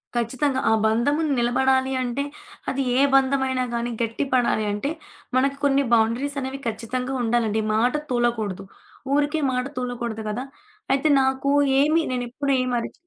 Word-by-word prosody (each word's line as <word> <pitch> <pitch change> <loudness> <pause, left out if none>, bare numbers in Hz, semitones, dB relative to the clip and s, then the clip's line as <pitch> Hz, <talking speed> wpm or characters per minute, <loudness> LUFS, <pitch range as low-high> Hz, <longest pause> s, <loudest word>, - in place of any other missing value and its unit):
ఖచ్చితంగా! 260 +3 0
ఆ - - +5
బంధము 235 +8 +2
న్ 295 - +1
నిలబడాలి 260 +2 +2
అంటే, 255 +2 -2 0.5
అది 270 +1 -1 0.2
ఏ - - +5
బంధమైనా 265 -1 +2
గానీ 235 +1 -2
గట్టిపడాలి 235 0 0
అంటే, 210 +7 -2 0.5
మనకు 275 +1 +1
కొన్ని 280 0 +3
బౌండరీస్ 235 +6 +1
అనేవి 265 +1 -5
ఖచ్చితంగా 250 +3 -3
ఉండాలండి. 225 -2 +1
మాట 240 +4 +2 0.2
తూలకూడదు. 235 -6 -1 0.5
ఊరికే 295 +2 +1
మాట 250 0 -1
తూలకూడదు 240 -3 -3
గదా! 240 +5 -3 0.5
అయితే, 275 +3 +1
నాకు 265 +1 +1 0.3
ఏమి 310 +3 +3
నేనెప్పుడు 250 +3 -2
ఏమి 255 -1 -2
అరిచి 230 - -5
255 Hz, 140 wpm, -23 LUFS, 235-275 Hz, 0.5 s, ఆ